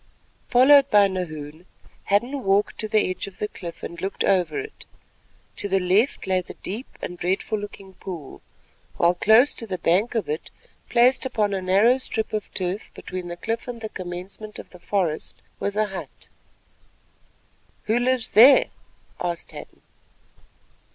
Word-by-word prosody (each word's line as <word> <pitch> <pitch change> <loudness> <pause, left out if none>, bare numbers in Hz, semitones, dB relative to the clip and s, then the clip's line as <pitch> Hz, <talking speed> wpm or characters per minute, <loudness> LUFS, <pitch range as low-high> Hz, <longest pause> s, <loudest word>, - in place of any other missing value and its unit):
Followed 275 +2 +6
by 205 -3 +6
Nahoon, 160 -3 -6 0.4
Hadden 240 +7 0
walked 195 +2 +1
to 215 - -1
the 215 -1 +2
edge 185 - -5
of 195 - -11
the 210 - -2
cliff 170 -4 -9
and 170 - -7
looked 195 +1 -2
over 190 - +2
it. 430 +1 -9 0.7
To 205 - -3
the 195 0 +2
left 190 +8 +1
lay 185 -1 +1
the 180 - -11
deep 220 +8 -6 0.2
and 175 0 -5
dreadful 190 +4 -1
looking 200 -2 -9
pool, 175 -8 -9 0.6
while 170 +1 +4
close 220 +9 +5
to 230 - -7
the 185 -2 -3
bank 185 +8 +1
of 225 - 0
it, 150 +2 -4 0.4
placed 245 +2 +4
upon 215 -6 0
a 190 - -1
narrow 200 +8 +4
strip 220 -4 -2
of 215 -1 -3
turf 185 +2 -3
between 185 -1 -6
the 175 0 -6
cliff 225 +7 -3
and 245 -1 -6
the 220 -1 -6
commencement 185 +4 -7
of - - -11
the 180 - -13
forest, 175 -5 -2 0.2
was 200 0 -2
a 215 0 +2
hut. 180 -8 -8 1.5
"Who 225 +3 +1
lives 250 -2 0
there?" 275 - +7 0.5
asked 175 -1 -3
Hadden. - - -12
200 Hz, 160 wpm, -24 LUFS, 180-225 Hz, 1.5 s, there